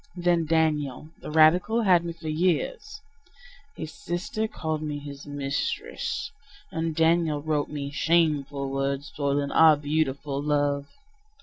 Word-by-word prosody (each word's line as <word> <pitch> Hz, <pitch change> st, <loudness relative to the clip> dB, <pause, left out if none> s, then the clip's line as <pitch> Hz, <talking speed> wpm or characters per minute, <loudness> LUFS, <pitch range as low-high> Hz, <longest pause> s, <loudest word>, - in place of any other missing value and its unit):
Then 175 Hz, -2 st, +1 dB
Daniel, 155 Hz, -3 st, 0 dB
the -, -, -7 dB
radical, 175 Hz, +9 st, +4 dB
had 180 Hz, -4 st, +5 dB
me 170 Hz, -1 st, -4 dB
for 165 Hz, -1 st, -10 dB
years. 180 Hz, -, -1 dB, 0.7 s
His 155 Hz, -1 st, -6 dB
sister 185 Hz, +5 st, -3 dB
called 160 Hz, -6 st, -3 dB
me 150 Hz, -1 st, -3 dB
his 145 Hz, 0 st, -9 dB
mistress; 145 Hz, -, -3 dB, 0.4 s
And 165 Hz, -1 st, -2 dB
Daniel 165 Hz, -2 st, +2 dB
wrote 150 Hz, -1 st, -1 dB
me: 140 Hz, -2 st, -5 dB
"Shameful 145 Hz, -3 st, +1 dB
word, 135 Hz, 0 st, -1 dB
soiling 140 Hz, 0 st, -1 dB
our 160 Hz, -2 st, +6 dB
beautiful 145 Hz, -1 st, -1 dB
love!" 145 Hz, -1 st, 0 dB
155 Hz, 125 wpm, -26 LUFS, 145-165 Hz, 0.7 s, our